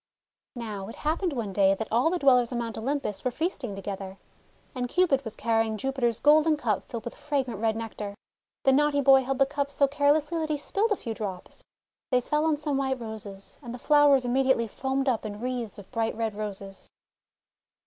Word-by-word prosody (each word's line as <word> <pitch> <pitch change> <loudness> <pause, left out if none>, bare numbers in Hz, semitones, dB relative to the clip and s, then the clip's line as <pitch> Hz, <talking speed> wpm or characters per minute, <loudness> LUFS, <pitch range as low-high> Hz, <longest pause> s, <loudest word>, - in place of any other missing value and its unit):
Now 210 -5 -5
it 225 - -8
happened 325 +4 -1
one 230 -8 -3
day 195 0 +4
that 220 +3 -4
all 240 +8 +3
the 360 - 0
Dwellers 250 -6 +4
on 245 - -2
Mount 230 -2 -3
Olympus 265 -3 -2
were 255 - +1
feasting 260 - -3
together, 195 -1 -6 0.6
and 250 -2 -3
Cupid 310 -6 +2
was 225 -3 -7
carrying 225 -1 0
Jupiter's 245 -2 -1
golden 305 +1 +5
cup 220 -8 0
filled 230 -2 -7
with 235 - -5
fragrant 270 -7 -2
red 220 0 +1
Nectar. 215 -2 -5 0.5
The 270 - +5
naughty 290 +1 +3
boy 270 -1 +6
held 265 +1 -2
the 275 - +5
cup 285 0 -2
so 280 0 +2
carelessly 290 +3 +2
that 315 -1 -2
he 300 - 0
spilled 405 +9 0
a - - +4
few 230 -10 -5
drops. 195 -5 -6 0.5
They 250 - +4
fell 300 +5 0
on 315 -2 +2
some 295 -2 -1
White 265 -1 -1
Roses, 215 -4 -7
and 240 -3 -7
the - - -7
flowers 285 -1 +4
immediately 260 -1 +2
foamed 265 +4 -2
up 245 -4 +1
in 210 -1 -6
wreaths 245 -3 -4
of 205 - -12
bright 230 -2 -1
Red 225 -2 -1
Roses. 200 -2 -7
250 Hz, 200 wpm, -27 LUFS, 220-285 Hz, 0.6 s, boy